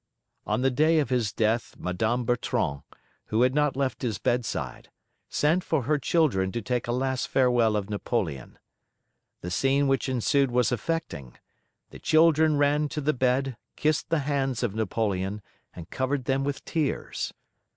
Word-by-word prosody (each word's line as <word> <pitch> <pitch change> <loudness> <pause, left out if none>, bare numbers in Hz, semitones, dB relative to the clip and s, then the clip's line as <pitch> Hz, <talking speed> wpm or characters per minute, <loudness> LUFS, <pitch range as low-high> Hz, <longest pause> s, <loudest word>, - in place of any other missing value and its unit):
On 125 - 0
the 135 - +3
day 155 +5 +3
of 145 -5 +1
his 120 -5 +1
death 110 +2 0
Madame 110 +7 -1
Bertrand, 90 - -1 0.4
who 110 +3 +1
had 130 +1 +3
not 150 -1 +1
left 135 -3 -1
his 115 -5 -1
bedside, 120 +1 -2 0.4
sent 165 +5 +1
for 155 -5 0
her 150 +4 +1
children 125 - +1
to - - -1
take 125 +2 -2
a - - -1
last 130 +1 -1
farewell 125 -4 +3
of 100 -2 -1
Napoleon. 100 - -3 0.8
The 90 - -5
scene 135 +7 +2
which 135 0 +1
ensued 130 +2 +2
was 125 0 +2
affecting: 120 - -3 0.5
the - - -11
children 155 -1 +4
ran 145 +1 +2
to 150 - -4
the 155 +2 +1
bed, 130 0 0 0.2
kissed 155 0 0
the 165 -2 +1
hands 135 -4 -1
of 115 -5 -1
Napoleon, 105 -2 -2 0.3
and 85 -1 -9
covered 130 0 -1
them 135 +1 +1
with 140 0 -3
tears. 155 -4 -2
125 Hz, 160 wpm, -26 LUFS, 110-145 Hz, 0.8 s, children